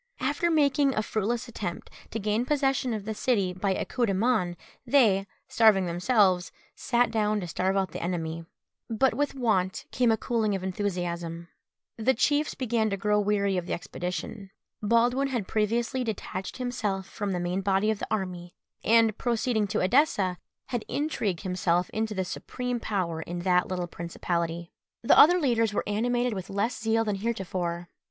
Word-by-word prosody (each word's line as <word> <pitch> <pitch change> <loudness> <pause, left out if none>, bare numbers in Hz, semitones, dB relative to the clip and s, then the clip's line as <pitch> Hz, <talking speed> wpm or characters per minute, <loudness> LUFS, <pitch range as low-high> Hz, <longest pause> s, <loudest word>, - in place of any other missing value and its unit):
After 290 +6 0
making 285 -3 +3
a 215 - +1
fruitless 220 +4 -2
attempt 200 -7 -6 0.2
to - - -4
gain 215 +2 0
possession 270 -2 +1
of 215 -3 -3
the 220 - -2
city 205 -5 +1
by 190 +1 -1
a - - -2
coup 245 -2 0
de 195 - 0
main, 190 -5 +1 0.3
they, 225 -7 +3 0.2
starving 215 -5 +4
themselves, 180 +1 +2 0.2
sat 240 -1 +1
down 215 -1 +1
to 180 - -5
starve 190 +3 0
out 190 -1 0
the - - -6
enemy. 165 -2 -3 0.5
But 235 +4 +2
with 285 +3 -1
want 200 -8 0
came 245 -2 +3
a 220 - +2
cooling 220 -3 0
of 190 - -4
enthusiasm. 175 -3 -3 0.5
The 245 +4 +2
chiefs 295 +5 +1
began 230 -4 0
to 200 - -2
grow 210 +1 +2
weary 200 -2 +1
of 180 0 -3
the - - -2
expedition. 180 +4 -5 0.3
Baldwin 240 +5 +2
had 240 -8 -2
previously 230 +4 0
detached 195 -4 -5
himself 215 -7 -2
from 205 -2 -4
the 180 - -1
main 175 +2 -1
body 195 +2 +2
of 215 - -3
the - - -4
army, 180 -4 -3 0.3
and, 225 -1 +4
proceeding 235 -3 0
to 215 +2 -1
Edessa, 190 - +2 0.3
had 240 -3 -2
intrigued 225 - -1
himself 180 -2 0
into 220 -1 -2
the 190 -1 -1
supreme 250 +6 -4
power 180 -8 -2
in 175 +2 -5
that 180 0 +2
little 180 -1 -2
principality. 170 0 -3 0.3
The - - +5
other 350 +4 +8
leaders 230 -7 +1
were - - +1
animated 240 +3 0
with 190 -2 -6
less 210 +5 -1
zeal 225 0 +2
than 210 -2 -1
heretofore. 185 -5 -3
210 Hz, 170 wpm, -27 LUFS, 185-235 Hz, 0.5 s, other